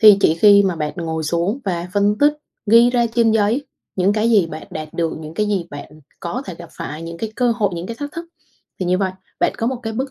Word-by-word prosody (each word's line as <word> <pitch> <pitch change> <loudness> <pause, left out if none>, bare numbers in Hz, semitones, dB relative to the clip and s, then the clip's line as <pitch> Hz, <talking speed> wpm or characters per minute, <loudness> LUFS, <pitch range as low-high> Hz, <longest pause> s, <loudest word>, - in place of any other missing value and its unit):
Thì 210 -2 +9
chỉ 160 - +4
khi 200 +3 +6
mà 185 -3 0
bạn 150 -1 -2
ngồi 160 -2 -3
xuống 170 - 0
và 175 -3 -2
phân 205 +1 +2
tích, 290 +1 +5 0.3
ghi 230 +3 +6
ra 240 -1 +2
trên 230 -2 +4
giấy 225 +6 +1 0.3
những 190 +2 +3
cái 220 +2 +1
gì 200 -6 +4
bạn 155 -1 -8
đạt 155 0 -5
được, 165 -1 0
những 155 0 -9
cái 210 - 0
gì 190 -5 -1
bạn 145 +1 -10 0.2
có 245 +10 -4
thể 180 - -6
gặp 170 0 -11
phải, 155 +2 -6
những 170 0 -7
cái 220 -1 -4
cơ 250 -2 +2
hội, 205 -4 +1
những 170 +2 -5
cái 230 - -6
thách 290 0 -5
thức, 335 +1 -6 0.6
thì 180 - -1
như 180 +1 +2
vậy 190 -2 0 0.3
bạn - - +3
có 230 - 0
một 260 - 0
cái 225 -1 -3
bức 260 +4 -3
200 Hz, 260 wpm, -20 LUFS, 170-230 Hz, 0.6 s, Thì